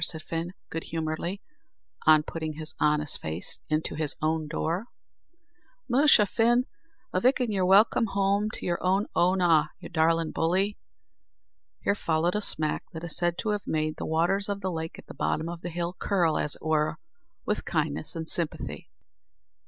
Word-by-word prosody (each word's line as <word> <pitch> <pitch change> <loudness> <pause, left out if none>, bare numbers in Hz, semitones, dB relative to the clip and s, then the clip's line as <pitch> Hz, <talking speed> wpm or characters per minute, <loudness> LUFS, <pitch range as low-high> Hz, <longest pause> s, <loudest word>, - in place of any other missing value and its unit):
said 160 0 +1
Fin, 170 +3 -4 0.2
good 165 - -4
humouredly, 165 +4 -3 0.6
on 155 -1 +7
putting 160 0 -4
his 155 +1 -5
honest 150 -1 +1
face 80 +3 -3
into 155 0 0
his 155 -2 0
own 155 0 0
door. 165 +7 -2 1.0
"Musha, 265 -4 +6
Fin, 240 +5 +3 0.5
avick, 250 +10 +3
an' 245 -3 0
you're 190 -3 +1
welcome 210 +4 +5
home 200 +1 +1
to - - -7
your 175 -1 -1
own 190 +3 +2
Oonagh, 175 -4 +4
you - - -9
darlin' 165 -1 +2
bully." 190 +5 0 1.0
Here - - +3
followed 170 -2 0
a 210 - 0
smack 155 -6 +1
that 160 0 -7
is 170 -3 -3
said 175 -1 0
to 220 - -2
have 210 -1 -2
made 155 0 -1
the - - -4
waters 175 +6 +1
of 200 0 -2
the 190 -1 -2
lake 160 -1 -5
at - - -12
the - - -10
bottom 160 +1 -1
of 170 0 -6
the 175 - -4
hill 175 +1 -3
curl, 175 -6 +2
as 150 - 0
it - - -17
were, 155 -1 +1 0.5
with 210 - -1
kindness 155 -3 -2
and 160 -1 -4
sympathy. 165 -2 -1
170 Hz, 170 wpm, -27 LUFS, 155-195 Hz, 1.0 s, on